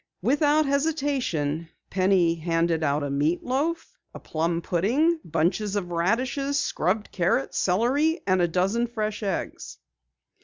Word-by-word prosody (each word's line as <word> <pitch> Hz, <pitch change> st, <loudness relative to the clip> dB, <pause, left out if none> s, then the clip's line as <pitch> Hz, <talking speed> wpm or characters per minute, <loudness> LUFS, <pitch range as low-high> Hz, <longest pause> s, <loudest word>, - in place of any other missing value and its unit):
Without 295 Hz, +5 st, +3 dB
hesitation, 275 Hz, -, -1 dB, 0.2 s
Penny 185 Hz, -3 st, +3 dB
handed 165 Hz, 0 st, 0 dB
out 145 Hz, 0 st, +1 dB
a 140 Hz, -, -3 dB
meat 150 Hz, +5 st, 0 dB
loaf, 290 Hz, +7 st, -2 dB, 0.2 s
a -, -, -7 dB
plum 165 Hz, +1 st, -1 dB
pudding, 270 Hz, -, +1 dB
bunches 175 Hz, +6 st, 0 dB
of 180 Hz, -4 st, -3 dB
radishes, 255 Hz, +11 st, 0 dB
scrubbed 195 Hz, +6 st, -1 dB
carrots, 175 Hz, -6 st, 0 dB
celery, 265 Hz, -, +2 dB
and 185 Hz, -2 st, +2 dB
a 175 Hz, -, +3 dB
dozen 195 Hz, +8 st, 0 dB
fresh 215 Hz, -2 st, -3 dB
eggs. 195 Hz, -4 st, -4 dB
195 Hz, 125 wpm, -25 LUFS, 170-270 Hz, 0.2 s, Without